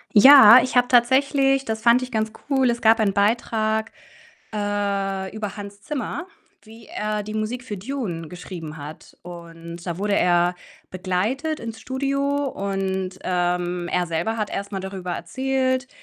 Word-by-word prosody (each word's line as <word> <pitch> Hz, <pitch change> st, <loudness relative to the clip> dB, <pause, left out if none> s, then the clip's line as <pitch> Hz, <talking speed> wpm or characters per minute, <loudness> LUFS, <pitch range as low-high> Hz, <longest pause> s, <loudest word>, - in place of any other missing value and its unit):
Ja, 255 Hz, 0 st, +10 dB
ich 255 Hz, -, -4 dB
habe 245 Hz, 0 st, +4 dB
tatsächlich 270 Hz, +2 st, +3 dB
das 220 Hz, -1 st, -4 dB
fand 240 Hz, +1 st, +5 dB
ich 255 Hz, 0 st, -6 dB
ganz 220 Hz, -1 st, -1 dB, 0.2 s
cool, 265 Hz, -3 st, +3 dB
es 235 Hz, -, -4 dB
gab 225 Hz, +1 st, +5 dB
einen 205 Hz, -3 st, +2 dB
Beitrag, 220 Hz, +1 st, 0 dB, 0.6 s
äh, 200 Hz, -2 st, -2 dB
über 210 Hz, -2 st, -5 dB
Hans 200 Hz, -1 st, -9 dB
Zimmer, 295 Hz, -, -5 dB, 0.4 s
wie 225 Hz, +1 st, -15 dB
er 210 Hz, 0 st, -3 dB
die 215 Hz, +1 st, -7 dB
Musik 215 Hz, +3 st, -3 dB
für 210 Hz, -5 st, -6 dB
„Dune“ 190 Hz, -, -5 dB
geschrieben 170 Hz, -2 st, -8 dB
hat 150 Hz, +1 st, -11 dB
und 170 Hz, -1 st, -10 dB
da 170 Hz, -2 st, -3 dB
wurde 200 Hz, +2 st, 0 dB
er 175 Hz, 0 st, +2 dB, 0.4 s
begleitet 205 Hz, -, -2 dB
ins 225 Hz, -1 st, -7 dB
Studio 275 Hz, +3 st, -1 dB
und, 195 Hz, -5 st, -3 dB
ähm, 175 Hz, -1 st, -1 dB
er 180 Hz, -1 st, 0 dB
selber 170 Hz, +7 st, -2 dB
hat 215 Hz, -2 st, -3 dB
erst 200 Hz, 0 st, -4 dB
darüber 190 Hz, -2 st, -5 dB
erzählt, 260 Hz, +7 st, -1 dB
210 Hz, 150 wpm, -22 LUFS, 185-250 Hz, 0.6 s, Ja